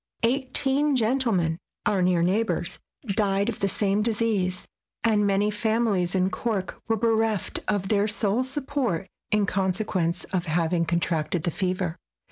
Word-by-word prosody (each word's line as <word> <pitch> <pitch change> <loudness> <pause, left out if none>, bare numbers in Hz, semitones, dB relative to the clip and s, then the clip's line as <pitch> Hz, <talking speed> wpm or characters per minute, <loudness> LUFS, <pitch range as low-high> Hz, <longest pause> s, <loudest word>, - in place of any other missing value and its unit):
Eighteen 270 +3 +2
gentlemen, 220 -9 +1 0.3
our 205 -3 +2
near 180 -2 +3
neighbors, 205 +6 0 0.3
died 200 0 +1
of 230 - -4
the 200 - +1
same 200 +1 +1
disease, 210 -5 0 0.4
and 210 -3 +3
many 200 +1 +2
families 210 -4 +1
in 185 0 +2
Cork 210 -5 -3
were 225 -1 +1
bereft 225 -2 0
of 200 -2 0
their 205 -1 +3
sole 215 +2 +1
support 260 - -2 0.2
in 210 -1 +2
conse 190 +2 0
quence 175 -2 -1
of 175 -2 -1
having 165 +1 +1
contracted 165 -1 0
the 170 - 0
fever. 185 -1 -2
200 Hz, 140 wpm, -25 LUFS, 180-225 Hz, 0.4 s, near